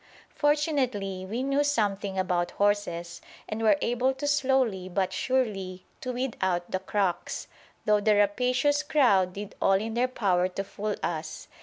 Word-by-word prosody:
Fortunately 255 Hz, -, 0 dB
we 235 Hz, +5 st, -2 dB
knew 275 Hz, +1 st, +2 dB
something 205 Hz, -8 st, 0 dB
about 180 Hz, -2 st, 0 dB
horses 200 Hz, -4 st, 0 dB, 0.3 s
and 215 Hz, +1 st, -4 dB
were 225 Hz, +6 st, +4 dB
able 250 Hz, +3 st, +1 dB
slowly 265 Hz, -9 st, +1 dB
but 190 Hz, 0 st, -1 dB
surely 200 Hz, -8 st, -1 dB
to 255 Hz, -, -4 dB
weed 250 Hz, 0 st, -2 dB
out 175 Hz, -2 st, 0 dB
the 185 Hz, -, 0 dB
"crocks," 190 Hz, -2 st, -2 dB, 0.4 s
though 210 Hz, 0 st, +4 dB
the 210 Hz, 0 st, +4 dB
rapacious 250 Hz, +8 st, +2 dB
crowd 220 Hz, -12 st, +3 dB
did 205 Hz, +1 st, -7 dB
all 195 Hz, -, +4 dB
in 220 Hz, +4 st, 0 dB
their 245 Hz, +2 st, +2 dB
power 185 Hz, -8 st, +1 dB
to 185 Hz, +2 st, -4 dB
fool 205 Hz, +1 st, -4 dB
us. 160 Hz, -2 st, -4 dB
205 Hz, 150 wpm, -27 LUFS, 190-255 Hz, 0.4 s, were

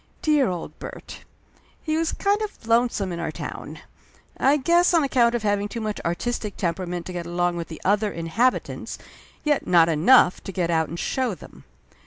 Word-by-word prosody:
Dear 300 Hz, -4 st, +3 dB
old 175 Hz, -2 st, -6 dB
Bert! -, -, -9 dB, 0.6 s
He 310 Hz, -1 st, -1 dB
was 325 Hz, 0 st, 0 dB
kind 405 Hz, +1 st, 0 dB
of 415 Hz, -, -6 dB
lonesome 230 Hz, -4 st, +1 dB
in 170 Hz, -, -4 dB
our 165 Hz, -2 st, -3 dB
town, -, -, -7 dB, 0.5 s
I 275 Hz, +3 st, +3 dB
guess, 345 Hz, +5 st, +3 dB
on 325 Hz, -, +4 dB
account 245 Hz, -3 st, +3 dB
of 235 Hz, -, -2 dB
having 205 Hz, -1 st, +1 dB
too 235 Hz, -, -5 dB
much 215 Hz, -2 st, -3 dB
artistic 205 Hz, +4 st, -3 dB
tem 170 Hz, -3 st, 0 dB
perament 180 Hz, -1 st, -5 dB
to 185 Hz, -, -7 dB
get 175 Hz, -1 st, -5 dB
along 175 Hz, 0 st, 0 dB
with 170 Hz, -1 st, -4 dB
the 160 Hz, -, -9 dB
other 205 Hz, +1 st, +2 dB
inhabitants, 170 Hz, +10 st, -1 dB, 0.5 s
yet 295 Hz, -2 st, +1 dB
not 170 Hz, -2 st, +5 dB
enough 180 Hz, +5 st, +5 dB
to -, -, -5 dB
get 175 Hz, -2 st, -1 dB
out 160 Hz, -1 st, +1 dB
and 170 Hz, -, -6 dB
show 255 Hz, -6 st, -1 dB
them. -, -, -15 dB
205 Hz, 190 wpm, -24 LUFS, 175-260 Hz, 0.6 s, not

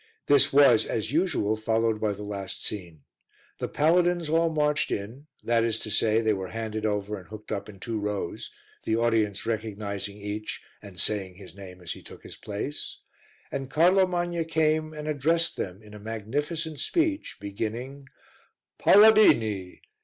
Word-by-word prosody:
This 140 Hz, 0 st, +5 dB
was, 135 Hz, -5 st, +6 dB
as 110 Hz, -, -2 dB
usual, 155 Hz, -, +1 dB
followed 110 Hz, 0 st, 0 dB
by 105 Hz, -2 st, +1 dB
the 105 Hz, +1 st, -8 dB
last 100 Hz, -2 st, -6 dB
scene. 85 Hz, -8 st, -6 dB, 0.6 s
The -, -, -2 dB
paladins 170 Hz, +1 st, +2 dB
all 165 Hz, +1 st, +3 dB
marched 150 Hz, -1 st, +1 dB
in 115 Hz, +9 st, -5 dB, 0.2 s
that 115 Hz, -1 st, +2 dB
is 115 Hz, -1 st, 0 dB
to 110 Hz, -, -6 dB
say, 110 Hz, +1 st, +3 dB
they 110 Hz, -1 st, +2 dB
were 95 Hz, -2 st, -4 dB
handed 110 Hz, 0 st, -3 dB
over 105 Hz, 0 st, -2 dB
and 90 Hz, -, -15 dB
hooked 105 Hz, 0 st, -10 dB
up 100 Hz, +1 st, -3 dB
in 100 Hz, -2 st, -12 dB
two 115 Hz, +1 st, -3 dB
rows, 105 Hz, -4 st, -4 dB, 0.3 s
the 110 Hz, -, 0 dB
audience 110 Hz, -3 st, +1 dB
recognizing 105 Hz, -3 st, -3 dB
each, 105 Hz, +1 st, -5 dB, 0.2 s
and 100 Hz, -4 st, -11 dB
saying 95 Hz, -4 st, -2 dB
his 95 Hz, 0 st, -13 dB
name 95 Hz, -2 st, -11 dB
as 85 Hz, -, -5 dB
he -, -, -7 dB
took -, -, -13 dB
his -, -, -10 dB
place, 105 Hz, +8 st, -6 dB, 0.5 s
and 135 Hz, -1 st, -4 dB
Carlo 185 Hz, +5 st, +4 dB
Magna 175 Hz, -1 st, -1 dB
came 155 Hz, -1 st, +1 dB
and 150 Hz, -1 st, -7 dB
addressed 160 Hz, +3 st, +2 dB
them 95 Hz, +3 st, -5 dB
in 105 Hz, 0 st, -14 dB
a 105 Hz, -, -9 dB
magnificent 145 Hz, -, -3 dB
speech 320 Hz, -, 0 dB
beginning 115 Hz, +7 st, -5 dB, 0.7 s
"Paladini! 115 Hz, -, +5 dB
110 Hz, 160 wpm, -27 LUFS, 105-150 Hz, 0.7 s, was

